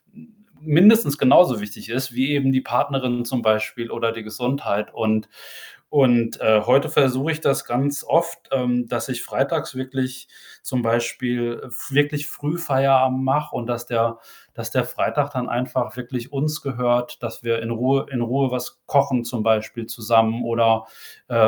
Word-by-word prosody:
m 230 -1 -19 0.3
mindestens 160 +1 +5
genauso 130 -5 +5
wichtig 105 +1 -9
ist, 130 +1 -3
wie 135 +3 +1
eben 135 -2 +2
die 130 - +2
Partnerin 125 -1 -1
zum 120 0 -2
Beispiel 110 +2 0
oder 115 - -1
die 115 -1 -8
Gesundheit 110 -2 -3
und 110 -1 -1 0.6
und, 120 -5 +3
äh, 110 -1 +4
heute 135 +5 +4
versuche 140 +1 +2
ich 155 - -7
das 135 - +1
ganz 135 +4 -1
oft, 170 0 0
ähm, 125 -2 0
dass - - -3
ich - - -3
freitags - - -2
wirklich 130 0 -4 0.4
zum 130 -2 -2
Beispiel 120 +1 -1
f 120 +3 -7
wirklich 145 +1 +1
früh 150 +4 -4
Feierabend 130 -4 +2
mache 150 +3 0
und, 120 -1 -4
dass 120 0 -4
der 115 -1 0 0.3
dass - - -7
der - - +1
Freitag 145 -1 -1
dann 125 -1 -3
einfach 125 -1 -2
wirklich 125 +1 -6
uns 150 +2 -2
gehört, 125 -2 -1
dass - - -6
wir 115 -1 0
in 115 +1 -5
Ruhe 130 +4 +1
in 125 -3 -2
Ruhe 130 +2 0
was 125 -1 -5
kochen 140 -4 +2
zum 115 -2 -3
Beispiel 110 +1 0
zusammen 115 +1 +2
oder, 115 -1 +2 0.4
äh, - - -6
125 Hz, 165 wpm, -22 LUFS, 115-135 Hz, 0.6 s, mindestens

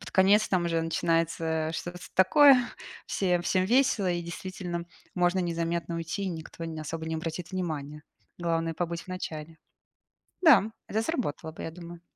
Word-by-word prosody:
под - - -9
конец 200 +3 +5
там 180 -2 +1
уже 165 -1 +1
начинается, 165 -1 0
э, - - -4
что-то 175 +1 -5 0.2
такое, 270 +9 +7 0.5
всем 180 -3 +1
всем 185 +1 +2
весело 240 -6 +3
и 175 0 -1
действительно 175 0 -5 0.3
можно 180 +1 +2
незаметно 170 0 -2
уйти, 165 +4 -3
и 195 - -1
никто 165 0 -7
не 160 -1 -5
особо 160 +1 -5
не 160 - -2
обратит 165 +2 -4
внимания. 150 -5 -4 0.4
Главное- 165 -1 -1
побыть 170 0 -3
в - - -21
начале. 160 -3 -6 0.8
Да, 230 - +6 0.2
это 220 +2 -1
сработало 225 - -2
бы, - - -9
я - - -4
думаю. 170 0 -10
170 Hz, 165 wpm, -28 LUFS, 165-185 Hz, 0.8 s, такое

